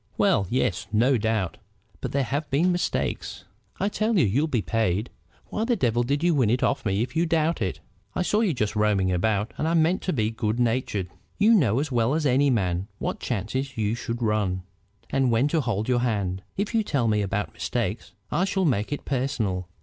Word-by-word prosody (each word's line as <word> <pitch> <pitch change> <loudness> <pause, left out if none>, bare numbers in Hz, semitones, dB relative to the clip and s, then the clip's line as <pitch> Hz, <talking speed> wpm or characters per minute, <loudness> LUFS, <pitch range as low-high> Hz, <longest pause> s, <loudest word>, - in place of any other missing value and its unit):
"Well, 95 - +3
yes; 115 -5 0
no 120 +5 +3
doubt. 110 -4 -1 0.4
But - - -4
there 140 0 +1
have 145 +4 -2
been 165 +7 +3
mistakes." 175 0 -2 0.3
"I 200 - +1
tell 215 +1 0
you 165 - +5
you'll 130 +10 +1
be 120 -9 0
paid. 105 +4 0 0.4
Why 215 - -2
the 240 +1 +2
devil 120 - +1
did 140 +6 0
you 175 -1 +4
win 130 -8 +3
it 125 +3 +1
of 140 - +1
me 100 +3 +1
if 125 - -7
you 170 +1 +2
doubt 160 -3 +1
it?" 95 -4 -2 0.3
"I - - +1
saw 210 +4 +1
you 210 -6 +2
just 110 -8 -1
roaming 105 -3 +2
about, 105 +4 0
and 155 - 0
I 165 - +1
meant 165 +3 +3
to 185 - -1
be 110 -7 0
good 115 0 -2
natured." 115 -6 0 0.3
"You 215 +3 +5
know 130 - +3
as 145 0 -2
well 120 +3 +2
as 160 -1 0
any 140 +1 +4
man 95 -6 0
what - - -3
chances 130 +4 -3
you 105 -1 0
should 120 0 -4
run, 100 -4 0 0.5
and 135 -2 +2
when 115 +4 +3
to 160 0 +1
hold 110 -4 -1
your 125 -1 +2
hand. 100 -6 -1 0.2
If 200 +4 -2
you 225 - +3
tell 140 - 0
me 105 -1 +2
about 100 +2 -2
mistakes, 115 -2 -3 0.2
I 175 +5 +2
shall 190 -1 0
make 110 -7 0
it 145 - -4
personal." 115 -10 -1
120 Hz, 210 wpm, -25 LUFS, 105-150 Hz, 0.5 s, you